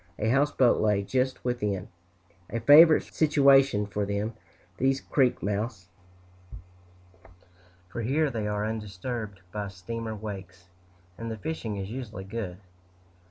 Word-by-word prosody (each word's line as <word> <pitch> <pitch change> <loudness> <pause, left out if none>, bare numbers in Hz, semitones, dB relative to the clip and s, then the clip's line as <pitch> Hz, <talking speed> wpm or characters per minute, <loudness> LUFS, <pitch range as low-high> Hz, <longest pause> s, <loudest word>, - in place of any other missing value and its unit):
A 110 - 0
houseboat 135 -1 +3
lay 105 -2 +2
just 130 +5 -1
within 105 -7 -2 0.6
a 115 - -2
favorite 150 +6 +8
situation 135 -7 +4
for 105 0 -3
them, 100 +3 -2 0.4
these 135 +1 +2
creek 130 -3 +1
mouths, 100 -2 -3 2.0
for 115 +5 -5
here 140 +6 +1
they 110 -3 -3
are 105 0 -1
undisturbed 110 -1 -5
by 105 0 -4
steamer 110 +4 -6
wakes, 95 -4 -8 0.5
and 115 0 -4
the 110 - -5
fishing 110 -4 -4
is 95 +1 -5
usually 115 -6 -6
good. 95 -3 -5
110 Hz, 120 wpm, -27 LUFS, 100-130 Hz, 2.0 s, favorite